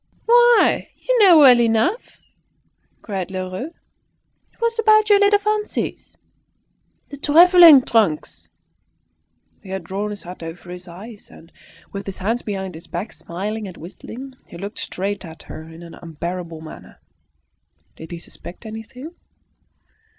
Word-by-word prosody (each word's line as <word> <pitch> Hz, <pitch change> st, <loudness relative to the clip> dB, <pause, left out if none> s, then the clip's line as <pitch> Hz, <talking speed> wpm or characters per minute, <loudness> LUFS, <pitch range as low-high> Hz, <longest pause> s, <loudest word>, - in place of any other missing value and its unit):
"Why, 480 Hz, 0 st, +4 dB
you -, -, 0 dB
know 375 Hz, -6 st, +7 dB
well 260 Hz, -5 st, +8 dB
enough," 235 Hz, -, 0 dB, 0.9 s
cried 190 Hz, -4 st, -4 dB
Lheureux. 185 Hz, +6 st, -5 dB, 0.8 s
"It -, -, -34 dB
was 465 Hz, 0 st, -1 dB
about 430 Hz, -1 st, +4 dB
your 405 Hz, -, +6 dB
little 410 Hz, 0 st, +5 dB
fancies 425 Hz, +1 st, -3 dB, 0.9 s
the 285 Hz, -, -9 dB
travelling 330 Hz, -1 st, +7 dB
trunks." 210 Hz, -12 st, 0 dB, 1.1 s
He 195 Hz, -, -14 dB
had 190 Hz, -1 st, -4 dB
drawn 195 Hz, +5 st, -4 dB
his 205 Hz, -1 st, -8 dB
hat 180 Hz, +1 st, -10 dB
over 165 Hz, +2 st, -9 dB
his 180 Hz, +1 st, -10 dB
eyes, 205 Hz, +5 st, -11 dB
and, 165 Hz, -, -17 dB, 0.4 s
with 200 Hz, 0 st, -7 dB
his 195 Hz, -, -6 dB
hands 225 Hz, +6 st, -1 dB
behind 190 Hz, -3 st, -5 dB
his 160 Hz, +1 st, -12 dB
back, 175 Hz, +5 st, -5 dB
smiling 205 Hz, +5 st, -5 dB
and 185 Hz, -, -11 dB
whistling, 240 Hz, -, -10 dB
he -, -, -11 dB
looked 200 Hz, +4 st, -7 dB
straight 200 Hz, +2 st, -4 dB
at 160 Hz, -3 st, -11 dB
her -, -, -9 dB
in 165 Hz, +1 st, -12 dB
an 170 Hz, -1 st, -12 dB
unbearable 170 Hz, 0 st, -7 dB
manner. 160 Hz, -, -12 dB, 1.0 s
Did 160 Hz, -, -11 dB
he 175 Hz, -, -6 dB
suspect 175 Hz, +4 st, -11 dB
anything? 225 Hz, +8 st, -9 dB
205 Hz, 140 wpm, -20 LUFS, -, 1.1 s, well